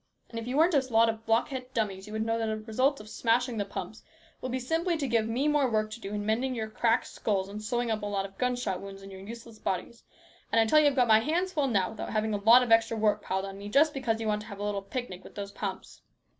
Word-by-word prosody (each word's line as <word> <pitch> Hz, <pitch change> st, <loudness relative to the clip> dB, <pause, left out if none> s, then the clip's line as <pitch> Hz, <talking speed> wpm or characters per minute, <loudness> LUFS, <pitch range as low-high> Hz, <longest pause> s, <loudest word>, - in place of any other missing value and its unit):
And 230 Hz, -, -4 dB
if 230 Hz, -, -7 dB
you 255 Hz, +3 st, -1 dB
weren't 330 Hz, +3 st, +4 dB
a 280 Hz, -, +5 dB
lot 225 Hz, 0 st, +5 dB
of 225 Hz, 0 st, -5 dB
block 225 Hz, +1 st, +2 dB
headed 260 Hz, -1 st, -7 dB
dummies, 200 Hz, -3 st, -2 dB
you 210 Hz, -, -8 dB
would 220 Hz, 0 st, -1 dB
know 225 Hz, 0 st, 0 dB
that 225 Hz, -, -1 dB
the 220 Hz, 0 st, -1 dB
result 255 Hz, +6 st, 0 dB
of 210 Hz, -, -11 dB
smashing 235 Hz, +2 st, +1 dB
the 205 Hz, -, 0 dB
pumps 200 Hz, -, -7 dB, 0.4 s
will 255 Hz, -, -4 dB
be 255 Hz, -, -1 dB
simply 325 Hz, +7 st, 0 dB
to 285 Hz, -3 st, -2 dB
give 230 Hz, -2 st, +1 dB
me 250 Hz, +6 st, 0 dB
more 295 Hz, -3 st, +3 dB
work 215 Hz, -1 st, 0 dB
to 225 Hz, -, -7 dB
do 195 Hz, -, -6 dB
in 205 Hz, 0 st, -3 dB
mending 250 Hz, +4 st, 0 dB
your 220 Hz, -2 st, -4 dB
cracked 230 Hz, +2 st, +2 dB
skulls 195 Hz, -3 st, -1 dB
and 205 Hz, +2 st, -7 dB
sewing 240 Hz, +2 st, -1 dB
up 215 Hz, -1 st, -1 dB
a 205 Hz, -, -3 dB
lot 200 Hz, -1 st, -1 dB
of 195 Hz, 0 st, -11 dB
gunshot 245 Hz, -7 st, -1 dB
wounds 195 Hz, 0 st, -9 dB
in 195 Hz, -, -10 dB
your 190 Hz, 0 st, -9 dB
useless 230 Hz, +2 st, -10 dB
bodies; 230 Hz, +5 st, -3 dB, 0.5 s
and 230 Hz, -, +4 dB
I 225 Hz, -, +5 dB
tell 305 Hz, +8 st, +5 dB
you 300 Hz, -, +5 dB
I've 285 Hz, -, +2 dB
got 250 Hz, -2 st, +4 dB
my 220 Hz, -1 st, +7 dB
hands 345 Hz, +10 st, -1 dB
full 290 Hz, -4 st, +1 dB
now 200 Hz, -7 st, +1 dB
without 220 Hz, -, -6 dB
having 215 Hz, 0 st, 0 dB
a -, -, +1 dB
lot 235 Hz, +4 st, +7 dB
of 240 Hz, -, -3 dB
extra 225 Hz, 0 st, +4 dB
work 210 Hz, -1 st, +2 dB
piled 190 Hz, +1 st, -2 dB
on 195 Hz, 0 st, -8 dB
me, 205 Hz, +1 st, -7 dB
just 295 Hz, +6 st, +4 dB
because 235 Hz, -5 st, -1 dB
you 225 Hz, -, -3 dB
want 210 Hz, -1 st, 0 dB
to 210 Hz, -, -11 dB
have 200 Hz, -3 st, -8 dB
a 205 Hz, -, -5 dB
little 205 Hz, -1 st, -1 dB
picnic 200 Hz, -2 st, -6 dB
with -, -, -14 dB
those 200 Hz, -1 st, -5 dB
pumps. 195 Hz, -2 st, -6 dB
225 Hz, 290 wpm, -29 LUFS, 210-250 Hz, 0.5 s, my